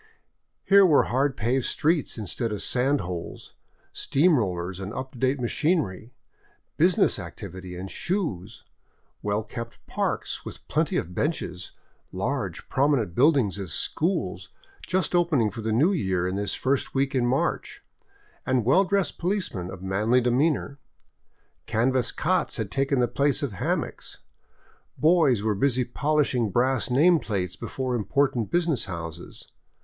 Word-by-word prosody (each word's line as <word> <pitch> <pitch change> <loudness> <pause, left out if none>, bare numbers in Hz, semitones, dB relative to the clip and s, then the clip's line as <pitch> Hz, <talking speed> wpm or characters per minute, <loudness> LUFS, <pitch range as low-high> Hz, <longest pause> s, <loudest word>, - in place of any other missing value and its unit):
Here 200 0 +6
were 160 -6 +5
hard 135 +2 0
paved 120 +3 0
streets 155 -4 0
instead 110 +2 -1
of 105 -1 -3
sand 135 +3 +2
holes, 85 -1 -7 0.4
steam 160 +4 +3
road 110 - +1
rollers 90 +2 -5
and 95 +1 -5
up 130 0 -5
to 125 - -13
date 130 +2 +1
machinery, 120 - -1 0.6
business - - +3
activity 90 0 -8
and 95 +2 -7
shoes, 115 - -3 0.6
well 105 +1 -1
kept 115 +1 -7
parks - - -3
with - - -10
plenty - - 0
of 90 - -3
benches, 90 - -3 0.4
large, - - -3
prominent 135 - +1
buildings 125 - +3
as 95 -6 -5
schools 150 - -1 0.2
— - - -18
just 185 -1 0
opening 160 -11 +2
for 115 - -7
the 110 0 -2
new 140 - +3
year 95 - 0
in 90 - -2
this 100 0 -1
first 135 +1 -1
week 135 0 +1
in 125 -2 +1
March 130 +3 -1 0.3
— - - -33
and 130 -3 0
well 160 +11 +5
dressed 195 -4 -1
policemen 170 - -2
of 95 -1 -9
manly 105 +6 +2
demeanor. 140 +3 +1 0.9
Canvas 120 +2 +1
cots 185 +2 0
had 110 -3 -4
taken 135 0 +1
the 125 -1 +3
place 140 +3 +1
of 135 -7 -2
hammocks. 95 - -3 0.8
Boys 155 - +3
were 110 -1 +1
busy 125 +4 +2
polishing 135 -3 +1
brass 120 +1 +1
name 160 +7 +5
plates 90 - -3
before 130 -1 -4
important 120 +1 0
business 170 -5 +1
houses. 85 -3 -8
125 Hz, 145 wpm, -25 LUFS, 100-145 Hz, 0.9 s, Here